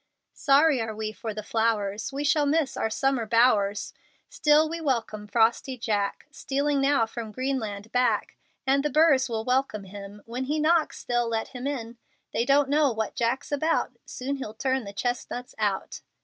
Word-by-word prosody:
Sorry 280 -2 +4
are 220 -1 -4
we 215 0 -3
for 220 +1 -6
the 215 0 -6
flowers; 220 0 0
We 280 +2 -3
shall 295 0 +3
miss 300 -1 +1
our 220 - -1
summer 260 0 0
bowers; 215 -3 +2 0.4
Still 300 +1 +4
we 330 +1 -5
welcome 230 -7 -2
frosty 235 +4 +2
Jack, 205 -4 -1
Stealing 280 0 -1
now 275 -4 +3
from 225 -1 -7
Greenland 225 -4 -3
back. 245 -4 +1 0.3
And 275 +1 +3
the 300 - +1
burrs 285 -3 +4
will 220 -1 -3
welcome 250 -5 0
him; 200 +1 -10
When 245 +3 -4
he 295 +4 -1
knocks, 315 +1 +2
they'll 240 -1 0
let 225 -1 -2
him 255 0 -5
in. 240 -4 -4 0.4
They 235 - +1
don't 280 +1 +4
know 290 -1 +3
what 220 -1 -3
Jack's 240 +4 -1
about; 310 +3 +1 0.2
Soon 275 +2 -4
he'll 220 -5 -7
turn 260 0 -1
the 200 - -7
chestnuts 245 +3 -3
out. 200 -2 -2
245 Hz, 175 wpm, -26 LUFS, 220-280 Hz, 0.4 s, Sorry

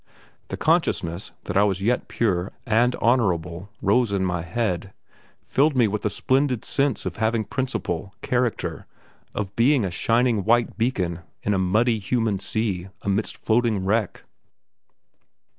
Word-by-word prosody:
The - - -5
consciousness 85 +3 0
that - - -5
I 100 - +5
was 95 -2 +1
yet 120 +5 0
pure 95 -5 0
and 120 +1 +3
honourable 90 -6 0
rose 115 +4 +3
to 100 - 0
my 90 -2 -1
head, 95 0 -2 0.5
filled 145 +1 +2
me 120 -3 +4
with 105 +1 -3
a - - 0
splendid 130 -2 0
sense 140 -3 0
of - - -4
having 110 +1 +1
principle, 105 -8 -3
character, 125 -2 -1 0.5
of 100 -2 -3
being 125 -1 +3
a 95 - -2
shining 115 +3 +2
white 120 +3 +2
beacon 95 -8 -1 0.2
in 105 - +1
a 95 - +1
muddy, 110 +5 +2
human 110 -1 0
sea 100 -3 -1 0.2
amidst 100 +2 -1
floating 110 -4 +1
wreck. 105 0 0
110 Hz, 140 wpm, -24 LUFS, 95-120 Hz, 0.5 s, I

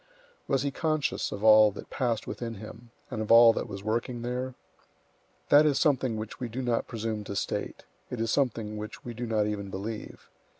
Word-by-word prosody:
Was 135 -2 +1
he 140 - -1
conscious 155 -1 -1
of 100 - -6
all 110 -1 +8
that - - -10
passed 120 -5 -1
within 115 -2 -5
him, 110 +3 -11 0.2
and 110 - -3
of 110 - -2
all 115 0 +9
that - - -3
was 100 -1 -7
working 120 +2 -2
there? 125 +1 -3 0.9
That 145 +1 +8
is 150 -3 +2
something 130 -7 +2
which 110 0 -6
we 125 - -4
do 130 +4 -4
not 120 -2 0
presume 110 -2 -3
to 100 - -5
state; - - -3 0.3
it 125 - -5
is 115 0 0
something 115 -6 0
which 105 0 -8
we 120 - -5
do 120 +1 -5
not 110 -2 +1
even 100 -2 -3
believe. 105 +3 -6
115 Hz, 200 wpm, -28 LUFS, 110-125 Hz, 0.9 s, all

